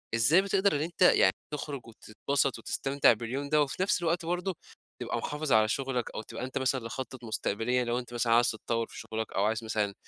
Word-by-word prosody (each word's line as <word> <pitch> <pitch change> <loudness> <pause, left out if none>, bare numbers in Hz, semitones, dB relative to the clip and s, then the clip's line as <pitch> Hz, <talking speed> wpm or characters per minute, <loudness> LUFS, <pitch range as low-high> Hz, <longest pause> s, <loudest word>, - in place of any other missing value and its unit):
إزاي 140 +11 +5
بتقدر 195 -2 +2
إن 145 - 0
أنت 165 +2 -5
يعني 95 - +6 0.2
تخرج 145 -2 -4
وتتبسط 130 +4 -2
وتستمتع 135 -3 +2
باليوم 125 +6 -4
ده، 150 0 +4
وفي 145 +6 0
نفْس 205 -2 +1
الوقت 170 0 0
برضه، 180 +2 -2 0.5
تبقى - - -2
محافظ 150 -1 -3
على 110 0 +5
شغلك 125 0 -2
أو - - -3
تبقى 115 - -8
أنت 130 +1 -4
مثلًا 130 -2 0
لخطط 130 +1 -7
مستقبلية 115 +2 0
لو 120 +1 -1
أنت 120 -1 -9
مثلًا 115 -1 +1
عايز 120 +1 +4
تتطوّر 115 +1 -2
في - - -10
شغلك، 110 0 -5
أو 100 - +1
عايز 110 +2 0
مثلًا 105 -2 -1
125 Hz, 200 wpm, -29 LUFS, 115-150 Hz, 0.5 s, يعني